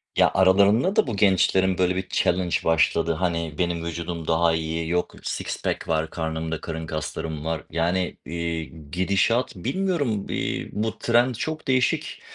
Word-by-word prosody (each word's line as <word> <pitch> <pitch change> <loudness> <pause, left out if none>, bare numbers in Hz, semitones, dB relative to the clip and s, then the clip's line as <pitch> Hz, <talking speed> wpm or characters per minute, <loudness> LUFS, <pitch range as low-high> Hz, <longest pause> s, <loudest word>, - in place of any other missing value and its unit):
Ya, - - +4
aralarında 100 - +4
da - - +3
bu 115 - -2
gençlerin, 95 -1 +3
böyle, 90 0 +2
bir 95 0 -3
challange 90 -1 +1
başladı. 80 0 +2
Hani, 85 -2 -2
benim 85 -2 -1
vücudum 85 -1 -4
daha 80 0 +3
iyi, 80 0 -2
yok 90 0 -1
"six - - -4
pack - - -2
var 80 -1 0
karnımda, 80 -1 -3
karın 80 -1 -5
kaslarım 80 0 -4
var." 80 -4 -2
Yani, 85 +3 0
eee, 85 0 -3 0.3
gidişat 100 +7 +1
bilmiyorum, 135 - -1
eee, - - -2
bu 110 +1 -2
trend 120 +1 +3
çok 155 +5 -4
değişik. 130 -1 +1
90 Hz, 150 wpm, -24 LUFS, 80-100 Hz, 0.3 s, Ya